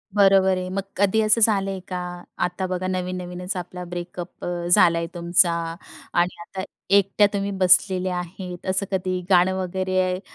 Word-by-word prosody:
बरोबर 195 Hz, -2 st, +5 dB
आहे, 185 Hz, 0 st, -4 dB
मग 195 Hz, +1 st, -2 dB, 0.2 s
कधी 205 Hz, +2 st, +3 dB
असं 215 Hz, +2 st, +3 dB
झालंय 195 Hz, -3 st, +2 dB
का? 180 Hz, -1 st, -4 dB, 0.4 s
आता 180 Hz, +1 st, -1 dB
बघा 185 Hz, 0 st, -3 dB
नवीन-नवीनच 180 Hz, 0 st, -4 dB
आपला 180 Hz, 0 st, -6 dB
ब्रेकअप 175 Hz, 0 st, -7 dB
अ, 175 Hz, -1 st, -3 dB
झाला 175 Hz, -1 st, +5 dB
आहे 170 Hz, 0 st, -2 dB
तुमचा 175 Hz, 0 st, +3 dB, 0.6 s
आणि 175 Hz, 0 st, +1 dB
आता 190 Hz, +2 st, -7 dB, 0.3 s
एकट्या 200 Hz, +1 st, +4 dB
तुम्ही 200 Hz, 0 st, -1 dB
बसलेल्या 185 Hz, 0 st, +3 dB
आहेत, 180 Hz, 0 st, -7 dB
असं 190 Hz, +1 st, 0 dB
कधी 185 Hz, -1 st, -1 dB
गाणं 185 Hz, 0 st, +4 dB
वगैरे 185 Hz, 0 st, -1 dB
185 Hz, 150 wpm, -23 LUFS, 180-190 Hz, 0.6 s, बरोबर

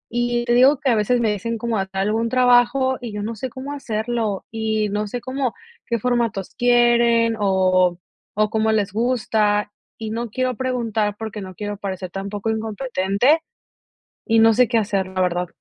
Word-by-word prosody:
Y 240 Hz, 0 st, 0 dB
te 240 Hz, -, +1 dB
digo 260 Hz, +4 st, +5 dB
que 275 Hz, -4 st, +1 dB
a -, -, +3 dB
veces 220 Hz, +3 st, +1 dB
me 220 Hz, -, +2 dB
dicen 230 Hz, +3 st, -3 dB
como 230 Hz, 0 st, -2 dB
a 190 Hz, -, -2 dB
tal 195 Hz, +1 st, -2 dB
algún 225 Hz, +2 st, 0 dB
trabajo, 255 Hz, +1 st, +3 dB
y 240 Hz, -2 st, -6 dB
yo 210 Hz, -, -4 dB
no 225 Hz, +2 st, -4 dB
sé 255 Hz, +4 st, -5 dB
cómo 265 Hz, +4 st, -7 dB
hacerlo, 225 Hz, -5 st, -3 dB
y 220 Hz, -1 st, -1 dB
no 210 Hz, +1 st, -2 dB
sé 240 Hz, +3 st, -5 dB
cómo 260 Hz, -2 st, -2 dB, 0.3 s
qué 235 Hz, -, 0 dB
formatos 235 Hz, -5 st, -1 dB
quieren, 235 Hz, -1 st, +3 dB
o 185 Hz, -3 st, +2 dB, 0.4 s
o, 215 Hz, 0 st, +2 dB
cómo 220 Hz, 0 st, +1 dB
les 205 Hz, -3 st, 0 dB
gusta, 215 Hz, -3 st, +1 dB, 0.3 s
y 220 Hz, -1 st, -5 dB
no 230 Hz, +1 st, -3 dB
quiero 255 Hz, +1 st, -1 dB
preguntar 225 Hz, -5 st, -1 dB
porque 220 Hz, -2 st, -6 dB
no 185 Hz, -1 st, -9 dB
quiero 205 Hz, +1 st, -5 dB
parecer 190 Hz, -2 st, -5 dB
tampoco 200 Hz, +3 st, -4 dB
incompetente, 220 Hz, -, 0 dB, 0.9 s
y 225 Hz, 0 st, +3 dB
no 225 Hz, 0 st, +6 dB
sé 250 Hz, +2 st, +4 dB
qué 235 Hz, -, +2 dB
hacer, 200 Hz, -3 st, 0 dB
la 185 Hz, 0 st, -4 dB
verdad. 180 Hz, 0 st, 0 dB
225 Hz, 185 wpm, -21 LUFS, 205-240 Hz, 0.9 s, no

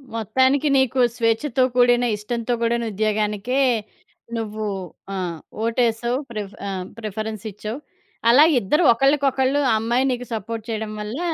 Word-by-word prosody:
మొత్తానికి 260 Hz, +6 st, +2 dB
నీకు 265 Hz, -1 st, +2 dB, 0.2 s
స్వేచ్ఛతో 235 Hz, +3 st, +1 dB
కూడిన, 245 Hz, 0 st, +4 dB
ఇష్టంతో 235 Hz, +3 st, -3 dB
కూడిన 235 Hz, 0 st, +1 dB
ఉద్యోగానికే 215 Hz, +4 st, 0 dB, 0.8 s
నువ్వు 215 Hz, -1 st, -4 dB, 0.5 s
ఆహ్, 180 Hz, -4 st, -3 dB, 0.2 s
ఓటేశావు, 235 Hz, +1 st, +1 dB
ప్రిఫ్ 210 Hz, -3 st, -6 dB
ఆహ్, 185 Hz, -2 st, -4 dB
ప్రిఫరెన్సిచ్చావు. 215 Hz, +2 st, -5 dB, 0.5 s
అలా 270 Hz, +6 st, +8 dB, 0.2 s
ఇద్దరూ 300 Hz, -, +1 dB
ఒకళ్ళకొకళ్ళు, 275 Hz, +1 st, +2 dB
ఆ -, -, +4 dB
అమ్మాయి 240 Hz, +4 st, +1 dB
నీకు 250 Hz, 0 st, -3 dB
సపోర్ట్ 225 Hz, +1 st, -5 dB
చేయడం 220 Hz, -1 st, -3 dB
వల్ల 215 Hz, +8 st, -5 dB
230 Hz, 115 wpm, -22 LUFS, 215-255 Hz, 0.8 s, అలా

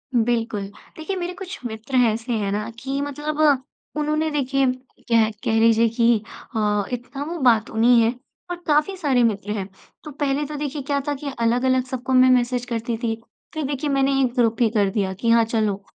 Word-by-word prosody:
बिल्कुल। 230 Hz, -2 st, +1 dB, 0.4 s
देखिए 320 Hz, +5 st, -4 dB
मेरे 355 Hz, -1 st, -3 dB
कुछ 385 Hz, 0 st, -7 dB
मित्र 225 Hz, +3 st, -5 dB, 0.2 s
ऐसे 230 Hz, +3 st, -3 dB
हैं 205 Hz, -3 st, -1 dB
ना 210 Hz, +2 st, -2 dB
कि 270 Hz, +3 st, -3 dB
मतलब 295 Hz, +2 st, -4 dB, 0.6 s
उन्होंने 305 Hz, +1 st, 0 dB
देखिए 275 Hz, -2 st, +1 dB, 0.4 s
कह 225 Hz, -2 st, +4 dB
कह 225 Hz, 0 st, +2 dB
लीजिए 230 Hz, 0 st, +5 dB
कि 230 Hz, 0 st, +3 dB, 0.4 s
अ, 210 Hz, -1 st, +1 dB
इतना 245 Hz, +3 st, -5 dB
वो 340 Hz, +2 st, -4 dB
बातूनी 230 Hz, +1 st, +4 dB
है 225 Hz, +1 st, +2 dB, 0.4 s
और -, -, -1 dB
काफ़ी 305 Hz, +5 st, +2 dB
सारे 270 Hz, -8 st, +2 dB
मित्र 210 Hz, -2 st, 0 dB
हैं। 190 Hz, -2 st, -4 dB, 0.4 s
तो 300 Hz, -, -8 dB
पहले 285 Hz, 0 st, -1 dB
तो 300 Hz, +1 st, -6 dB
देखिए 290 Hz, 0 st, -3 dB
क्या 280 Hz, +1 st, -1 dB
था 290 Hz, -, +1 dB
कि 280 Hz, +1 st, -5 dB
अलग-अलग 250 Hz, +2 st, +2 dB
सबको 260 Hz, 0 st, -4 dB
मैं 255 Hz, 0 st, +6 dB
मैसेज 250 Hz, -1 st, +2 dB
करती 235 Hz, -1 st, -3 dB
थी। 225 Hz, -1 st, -2 dB, 0.4 s
फिर 315 Hz, -, -3 dB
देखिए 285 Hz, +1 st, -2 dB
मैंने 275 Hz, 0 st, +2 dB
एक 250 Hz, -2 st, +1 dB
ग्रुप 230 Hz, 0 st, +1 dB
ही 230 Hz, -, +5 dB
कर 205 Hz, -3 st, +2 dB
दिया 195 Hz, -1 st, -1 dB
कि 230 Hz, +5 st, -2 dB
हाँ 230 Hz, 0 st, +6 dB
चलो, 215 Hz, -3 st, -1 dB
245 Hz, 190 wpm, -22 LUFS, 225-285 Hz, 0.6 s, मैं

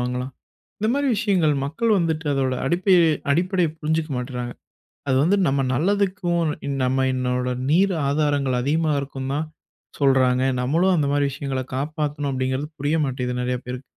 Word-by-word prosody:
வாங்கலாம்? 125 Hz, +2 st, -3 dB, 0.5 s
இந்த 215 Hz, -, +1 dB
மாரி 285 Hz, 0 st, 0 dB
விஷயங்கள் 185 Hz, -8 st, +2 dB
மக்கள் 210 Hz, +11 st, +1 dB
வந்துட்டு 160 Hz, -2 st, -1 dB
அதோட 130 Hz, -1 st, 0 dB
அடிப்படைய- 180 Hz, +3 st, +3 dB, 0.3 s
அடிப்படைய 180 Hz, +2 st, +2 dB
புரிஞ்சுக்க 160 Hz, 0 st, -1 dB
மாட்டுறாங்க. 125 Hz, -1 st, -4 dB, 0.6 s
அது 130 Hz, -, +3 dB
வந்து 195 Hz, +5 st, +3 dB
நம்ம 135 Hz, 0 st, +1 dB
நல்லதுக்கும் 185 Hz, +1 st, +1 dB, 0.2 s
இன்ன 140 Hz, -, -2 dB
நம்ம 130 Hz, +1 st, +1 dB
என்னோட 125 Hz, 0 st, -1 dB, 0.2 s
நீர் 190 Hz, +5 st, +3 dB, 0.2 s
ஆதாரங்கள் 140 Hz, -4 st, +1 dB
அதிகமா 155 Hz, +3 st, +1 dB
இருக்கும்னு 135 Hz, -1 st, -5 dB
தான் 155 Hz, +1 st, -3 dB, 0.5 s
சொல்றாங்க. 130 Hz, -2 st, +3 dB, 0.2 s
நம்மளும் 170 Hz, +8 st, +2 dB
அந்த 150 Hz, -4 st, +1 dB
மாரி 145 Hz, 0 st, +2 dB
விஷயங்கள 135 Hz, -2 st, -3 dB
காப்பாத்தணும் 145 Hz, 0 st, -2 dB
அப்படிங்கிறது 130 Hz, +2 st, -2 dB
புரிய 145 Hz, +3 st, 0 dB
மாட்டேங்குதும் 125 Hz, -2 st, -2 dB
நிறைய 125 Hz, 0 st, -1 dB
பேருக்கு. 125 Hz, +1 st, -6 dB
145 Hz, 145 wpm, -23 LUFS, 130-165 Hz, 0.6 s, அடிப்படைய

